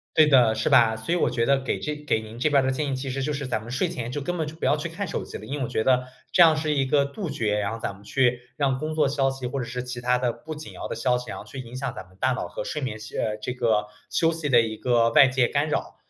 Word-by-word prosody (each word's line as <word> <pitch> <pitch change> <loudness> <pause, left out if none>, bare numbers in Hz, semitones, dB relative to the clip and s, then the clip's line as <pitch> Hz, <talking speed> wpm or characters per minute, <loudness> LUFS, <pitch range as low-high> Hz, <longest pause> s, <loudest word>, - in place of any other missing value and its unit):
对 155 -1 +6
的， 125 -6 +5
是 110 - 0
吧。 115 -3 +6
所 110 +9 -4
以 - - +3
我 - - +2
觉 120 -1 0
得 140 +3 +3
给 135 - -2
这 150 -1 -3
给 150 -6 -1
您 110 +1 -10
这 130 - +2
边 140 -2 +4
的 130 - +1
建 145 +3 -1
议 - - +1
其 130 +1 -4
实 135 +1 -3
就 145 +3 -1
是 140 -2 -4
咱 110 - -1
们 115 +2 -10
睡 135 +8 +1
前 125 -8 -5
就 145 - -3
根 175 +5 -3
本 160 - -1
就 150 - -7
不 160 - -7
要 - - +3
去 150 +3 -4
看 180 +4 -5
手 - - -3
机 - - -8
了。 - - -11
因 145 - -4
为 135 - -1
我 - - -3
觉 110 - 0
得 125 +1 +3 0.3
这 - - +2
样 160 -2 +8
是 155 0 -1
一 135 -2 +1
个 140 +1 +3
杜 165 +7 -5
绝， 110 -7 0
然 100 0 -1
后 115 - -6
咱 - - -3
们 100 +1 -17
去 125 +1 +1 0.2
让 135 -2 +1
工 155 +2 -3
作 150 -3 +3
消 135 -1 +1
息 135 -1 -7
或 140 - -3
者 125 - -2
是 125 +2 -4
其 125 -1 -6
它 125 +1 +2
的 125 -1 0
不 155 +5 -8
紧 155 +1 -9
要 - - -7
的 - - -4
消 125 +2 +1
息， 125 -3 -8
然 - - -6
后 - - -9
去 105 +6 -10
影 120 -1 -8
响 130 +2 -3
咱 - - -7
们 95 - -22
大 130 - +3
脑 125 - -2
和 - - -5
睡 150 - -4
眠 130 -6 -3 0.2
呃， 105 -1 -1
这 125 - -2
个 110 -4 +1 0.2
休 165 - +2
息 160 -2 -3
的 120 -3 +6
一 110 -1 -2
个 115 0 +2
外 140 - +7
界 130 -2 +2
干 145 +2 0
扰。 150 - -2
130 Hz, 355 characters per minute, -25 LUFS, 120-150 Hz, 0.3 s, 样